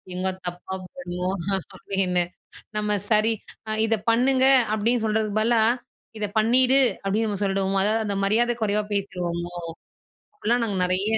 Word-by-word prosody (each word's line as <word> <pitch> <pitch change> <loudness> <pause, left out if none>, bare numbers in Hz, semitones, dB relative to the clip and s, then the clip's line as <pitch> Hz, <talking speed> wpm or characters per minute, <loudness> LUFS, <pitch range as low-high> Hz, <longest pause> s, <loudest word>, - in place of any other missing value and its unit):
"எங்க 185 +1 0 0.2
தப்பா 175 +2 -5
போய்டுமோ?" 180 0 -5 0.5
அப்படீன்னு. 185 -2 0 0.5
நம்ம 210 -1 +1
சரி, 215 +1 +4 0.4
அ - - -1
"இத 225 0 +2 0.2
பண்ணுங்க." 260 +3 +3 0.3
அப்படீன்னு 225 +2 +1
சொல்றதுக்கு 215 -1 0
பதிலா, 230 +1 +3 0.6
"இத 210 - -1
பண்ணீடு." 250 +4 +4 0.3
அப்படீன்னு 210 +3 0
நம்ம 205 -1 -4
சொல்லிடுவோமோ? 195 0 0
அதாவது 220 +2 +1
அந்த 200 -1 -1
மரியாதை 235 +4 +2
குறைவா 210 0 +1
பேசிருவோமோ? 175 -3 -3 0.8
அப்படிலாம் 240 - 0
நாங்க 200 -3 -3
நெறைய 185 +2 +1
210 Hz, 135 wpm, -24 LUFS, 190-225 Hz, 0.8 s, சரி